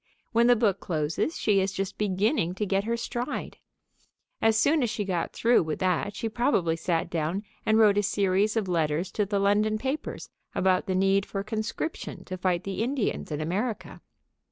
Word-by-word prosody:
When 235 0 +4
the 245 - +6
book 210 -4 +1
closes 160 - -1
she 205 -2 +2
is 190 +1 0
just 195 0 -3
beginning 200 - +1
to 210 - -1
get 195 +1 0
her 235 +1 0
stride. 245 +3 -4 0.8
As 225 -1 +4
soon 295 +7 +3
as 240 - +1
she 210 -1 -2
got 180 -3 -1
through 240 +1 +3
with 155 -2 -3
that 185 +2 0
she 225 - -2
probably 215 - +1
sat 165 0 -1
down 170 +5 -2 0.2
and 220 0 +4
wrote 210 -2 +5
a - - +3
series 200 +2 +1
of 215 -3 0
letters 165 +1 0
to 210 -2 0
the 200 0 0
London 205 +2 +2
papers 270 +6 -4 0.2
about 185 +3 +2
the 185 - 0
need 195 +1 +3
for 195 0 -4
conscription 220 +9 -4
to 185 - -5
fight 180 -2 0
the 195 +1 -3
Indians 250 - -1
in 150 0 -2
America. 200 +8 -3
200 Hz, 185 wpm, -27 LUFS, 185-220 Hz, 0.8 s, the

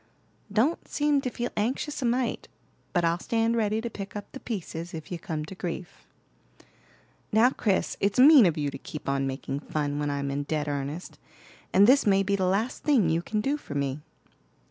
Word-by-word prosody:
"Don't 240 +11 +1
seem 290 -1 +1
to 255 - -2
feel 240 0 -4
anxious 265 +7 -2
a - - 0
mite. 240 0 0 0.4
But 175 -2 +1
I'll 165 +1 +1
stand 230 +3 +1
ready 215 -1 +1
to 235 - -3
pick 200 0 -7
up 205 - -7
the 270 - -8
pieces, 175 -7 -5
if 160 +2 -8
you 175 - -4
come 155 -3 -4
to 175 - -9
grief." 180 -1 -6 1.2
"Now, 225 +4 +5
Chris, 205 -7 0
it's 200 0 0
mean 270 - +8
of 165 - 0
you 145 -2 -1
to - - -8
keep 150 - -8
on 140 0 0
making 135 +1 -4
fun 145 -1 -2
when 145 0 -1
I'm 140 -1 -2
in 140 +1 -1
dead 150 +1 -2
earnest; 145 +4 -4 0.5
and 195 +2 +6
this 260 +1 +5
may 195 -1 +4
be 200 +1 +1
the 190 -2 0
last 210 +7 0
thing 235 - +3
you 165 +1 +1
can 215 +4 -2
do 280 +6 0
for 150 - -9
me." 140 0 -1
195 Hz, 200 wpm, -27 LUFS, 150-235 Hz, 1.2 s, mean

